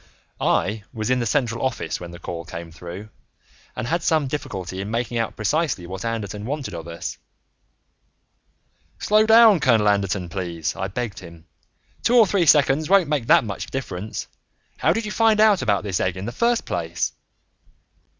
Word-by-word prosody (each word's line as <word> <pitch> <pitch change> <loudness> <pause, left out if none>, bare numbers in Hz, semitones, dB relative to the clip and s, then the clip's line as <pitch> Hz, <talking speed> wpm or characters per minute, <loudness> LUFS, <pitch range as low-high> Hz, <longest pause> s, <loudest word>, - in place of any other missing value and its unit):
I 105 +1 0
was 110 +2 -3
in 130 - +2
the 120 - -1
central 115 -2 0
office 130 -11 -2
when 85 - -8
the 85 - -10
call 85 0 -6
came 85 -1 -8
through, 90 +5 -9 0.7
and 110 - -3
had 170 +8 0
some 160 -3 +2
difficulty 105 -10 -5
in 100 - -5
making 115 +1 -2
out 115 - -2
precisely 115 - -1
what 95 +2 -6
Anderton 105 -3 -4
wanted 135 -3 -4
of 85 -1 -7
us. 85 0 -6 1.8
"Slow 215 +1 +3
down, 220 -4 +7
Colonel 115 -6 +3
Anderton, 100 -3 +1
please," 85 -4 -4
I 95 - -3
begged 115 +2 -4
him. 85 -2 -13 0.6
"Two 245 - +2
or 230 -3 +8
three 185 -4 +1
seconds 150 +1 +4
won't 195 -5 +4
make 140 -6 -1
that - - +6
much 105 -4 -5
difference. 110 -6 -5 0.5
How - - +2
did 225 0 -1
you 210 - -4
find 220 -1 +3
out 215 -3 +5
about 100 -2 +1
this 95 -4 -2
egg 90 0 -1
in 95 - -5
the 120 - -4
first 235 - +1
place?" 85 -1 -2
110 Hz, 175 wpm, -23 LUFS, 95-150 Hz, 1.8 s, or